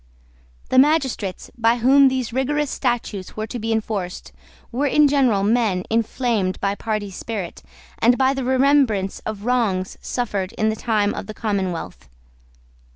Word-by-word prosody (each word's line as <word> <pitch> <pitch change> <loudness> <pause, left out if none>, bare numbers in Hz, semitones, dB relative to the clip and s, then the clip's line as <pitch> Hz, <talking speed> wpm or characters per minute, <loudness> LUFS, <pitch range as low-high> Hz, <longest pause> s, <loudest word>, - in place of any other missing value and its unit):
The 260 - +4
magistrates, 265 - +1
by 230 0 +3
whom 270 +3 +6
these 260 -3 -1
rigorous 285 +3 0
statutes 230 -7 -3
were 215 - -2
to 240 +2 -6
be 225 +1 -2
enforced, 210 -5 -3 0.4
were 270 +4 0
in 295 +2 +5
general 260 -8 +2
men 210 -4 +1
inflamed 225 -4 0
by 200 0 0
party 210 -1 -3
spirit 190 - -6 0.4
and 240 +2 +4
by 265 0 +3
the 270 -1 -3
remembrance 260 -6 +2
of 215 -1 -5
wrongs 215 -7 0
suffered 205 -6 -3
in 215 0 0
the 220 - -1
time 215 -2 0
of - - -6
the 215 - -7
commonwealth. 185 - -3
225 Hz, 150 wpm, -21 LUFS, 200-260 Hz, 0.4 s, whom